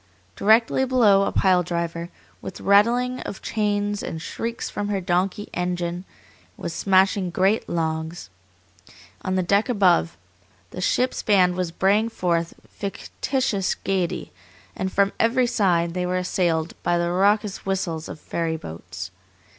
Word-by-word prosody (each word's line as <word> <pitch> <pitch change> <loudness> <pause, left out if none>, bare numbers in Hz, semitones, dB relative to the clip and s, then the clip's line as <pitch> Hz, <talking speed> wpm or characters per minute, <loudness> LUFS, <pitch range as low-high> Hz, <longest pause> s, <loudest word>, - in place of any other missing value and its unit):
Directly 225 +5 +3
below 220 -7 +4
a - - -1
pile 185 -2 +3
driver, 170 -1 -3 0.3
with 190 - -7
rattling 240 +5 +3
of 195 - -7
chains 205 -1 -1
and 160 - -5
shrieks 230 +7 -4
from 205 0 -4
her 205 -1 -1
donkey 185 +3 -1
engine, 180 0 -2 0.5
was 170 - -5
smashing 190 +1 +2
great 190 +5 +1
logs; 160 - -3 0.9
on 185 - -2
the 185 - +1
deck 200 +6 +2
above, 185 - +3 0.5
the 180 - -6
ship's 250 +7 +1
band 185 -4 +4
was 180 -1 -2
braying 205 +6 +2
forth 170 -6 -1
fictitious 200 0 -2
gayety, 190 -3 -2 0.4
and 190 0 -2
from 200 +1 +2
every 245 +3 +3
side 175 -8 +1
they 180 0 -1
were 180 0 0
assailed 170 -3 0
by 175 - +1
the 170 0 0
raucous 200 +2 +1
whistles 175 -4 -2
of - - -8
ferry 165 0 -2
boats. 90 - -8
185 Hz, 140 wpm, -23 LUFS, 170-205 Hz, 0.9 s, below